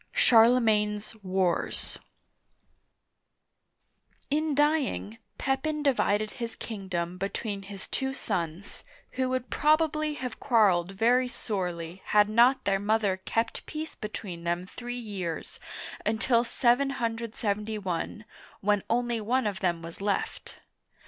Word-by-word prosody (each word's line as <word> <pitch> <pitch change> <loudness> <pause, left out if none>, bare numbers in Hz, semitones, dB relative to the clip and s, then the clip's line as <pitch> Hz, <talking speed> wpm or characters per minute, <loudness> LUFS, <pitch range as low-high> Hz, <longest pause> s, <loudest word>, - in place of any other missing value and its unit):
CHARLEMAGNE^S 220 - +4
WARS 185 -2 0 2.3
IN 305 0 +1
dying, 290 -7 +1 0.2
Pepin 295 +3 -1
divided 215 -6 +2
his 230 -2 -5
kingdom 185 -5 -4
between 200 +1 -3
his 195 0 -8
two 265 0 -2
sons, 175 -6 -4 0.3
who 260 0 -1
would 255 -1 -2
probably 305 0 +2
have 250 -4 -5
quarreled 195 -8 +3
very 245 +5 +3
sorely 180 -7 -4
had 210 0 +4
not 240 +5 +5
their 195 -1 +2
mother 205 -2 +1
kept 230 +1 -1
peace 315 +1 -5
between 195 -5 -6
them 175 +1 -1
three 245 +6 -6
years, 195 -8 -5 0.4
until 230 +2 +2
771, 225 -6 -1 0.4
when 205 0 +2
only 240 -1 +1
one 250 +4 +1
of 200 -2 -1
them 170 -3 0
was 165 +3 -9
left. 200 0 -2
220 Hz, 110 wpm, -28 LUFS, 195-250 Hz, 2.3 s, not